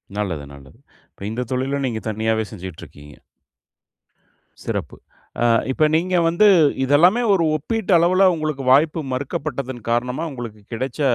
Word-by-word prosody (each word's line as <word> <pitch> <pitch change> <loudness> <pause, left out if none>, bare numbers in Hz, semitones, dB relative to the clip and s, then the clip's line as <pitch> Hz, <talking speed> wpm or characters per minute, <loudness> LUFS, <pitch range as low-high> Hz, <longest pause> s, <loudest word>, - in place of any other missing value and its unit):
நல்லது, 95 -8 -3
நல்லது. 70 +8 -15 0.3
இப்ப 100 - -10
இந்த 125 +3 -3
தொழிலும் 135 +2 -1
நீங்க 110 -2 -4
தனியாவே 110 +1 0
செஞ்சிட்டு 95 -5 -9
இருக்கீங்க. 75 0 -15 1.5
சிறப்பு! - - -4 0.5
ஆ, - - +3 0.3
இப்ப 155 +3 +2
நீங்க 180 +3 0
வந்து, 170 +6 +4 0.4
இது 135 +2 0
எல்லாமே 185 +10 +4
ஒரு 180 -4 +2
ஒப்பீட்டு 215 +7 -3
அளவுல, 180 +3 +3
உங்களுக்கு 155 -3 -3
வாய்ப்பு 150 +4 +4
மறுக்கப்பட்டதன் 130 -1 -4
காரணமா 125 +6 -1
உங்களுக்கு 115 -5 -8
கிடைச்ச, 130 +5 -4
130 Hz, 135 wpm, -21 LUFS, 110-155 Hz, 1.5 s, வந்து